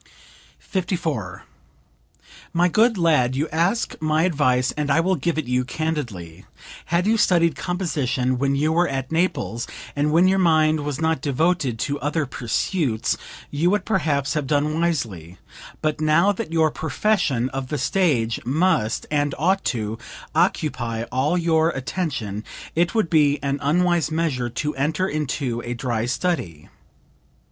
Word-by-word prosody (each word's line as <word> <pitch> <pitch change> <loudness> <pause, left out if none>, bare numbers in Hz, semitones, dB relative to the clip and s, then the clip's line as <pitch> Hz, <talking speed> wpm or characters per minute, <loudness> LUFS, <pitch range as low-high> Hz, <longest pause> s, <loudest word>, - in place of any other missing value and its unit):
54. 165 - -3 1.1
"My 175 +1 +3
good 225 +5 +3
lad, 150 -8 +3
you 150 +4 0
ask 175 +9 0
my 155 +1 +2
advice 130 -7 +2
and 150 -1 -3
I 140 - +4
will 185 +3 +2
give 165 +2 -1
it 155 - -1
you 125 +1 +1
candidly; 125 - -4 0.4
had 170 +2 +1
you 225 +2 +3
studied 170 -6 +3
composition 140 -8 -1
when 140 0 +1
you 150 +3 +1
were 175 +2 +3
at 135 0 -3
Naples, 160 -9 -1 0.3
and 145 +1 +1
when 170 +4 +5
your 190 +1 +3
mind 155 -3 +3
was 145 -1 -3
not 160 -3 0
devoted 145 -2 0
to 145 +5 -2
other 150 +2 -1
pursuits, 125 - -1 0.4
you 155 +5 +1
would, 205 -1 0
perhaps, 150 -9 0
have 150 -4 -2
done 150 +2 +1
wisely; 105 - -2 0.5
but 155 0 0
now 160 +6 +4
that 180 -5 -5
your 160 -2 +3
profession 155 - 0
of 135 -1 -4
the 150 - -2
stage 135 -12 +1
must, 135 -4 +1
and 145 -2 0
ought 190 +6 +1
to, 110 -2 -2 0.3
occupy 120 -6 0
all 140 +7 +1
your 165 -2 +2
attention, 135 - -3 0.3
it 170 +5 +1
would 220 -6 +2
be 150 -3 +4
an 140 0 -1
unwise 175 +2 +2
measure 155 -7 -1
to 150 +6 -3
enter 150 +7 0
into 140 -6 -2
a 120 0 -4
dry 120 -2 -2
study. 125 - -2
150 Hz, 150 wpm, -22 LUFS, 130-170 Hz, 1.1 s, when